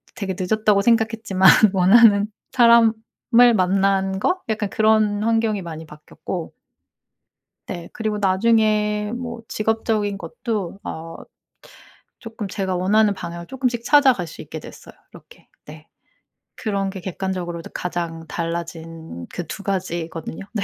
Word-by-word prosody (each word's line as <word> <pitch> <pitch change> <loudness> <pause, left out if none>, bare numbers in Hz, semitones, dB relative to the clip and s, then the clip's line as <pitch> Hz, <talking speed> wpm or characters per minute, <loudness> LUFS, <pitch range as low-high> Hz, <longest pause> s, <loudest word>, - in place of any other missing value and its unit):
'되게 195 -5 -4
늦었다.'고 210 +2 +2
생각했지만 225 -4 +3 0.2
원하는 200 +2 +5 0.3
사람을 235 -2 +6 0.6
만난 195 0 +1
거? 365 - 0
약간 215 -2 -1
그런 215 -1 +2
환경이 225 -2 +1
많이 160 -1 -8
바뀌었고 160 +3 -8 1.1
네. 175 -3 -6
그리고 215 -1 -2
나중에 210 +1 +1
뭐 240 -1 -6
직업적인 220 -2 -1
것도 205 -4 -5
어 165 +1 -7 1.0
쪼끔 225 -2 -7
제가 190 -1 -3
원하는 205 +3 +3
방향을 170 -2 -7
쪼끔씩 250 -3 -2
찾아갈 265 - +4
수 160 - -10
있게 - - -8
됐어요 - - -13 0.2
이렇게. - - -17 0.2
네. - - -13 0.7
그런 200 -2 -2
게 190 0 -7
객관적으로도 180 -2 -5
가장 170 -2 -4
달라진 165 - -6
그 175 - -5
2 200 - -7
가지거든요. 170 -3 -4
네. 210 -3 -1
200 Hz, 275 characters per minute, -21 LUFS, 175-220 Hz, 1.1 s, 사람을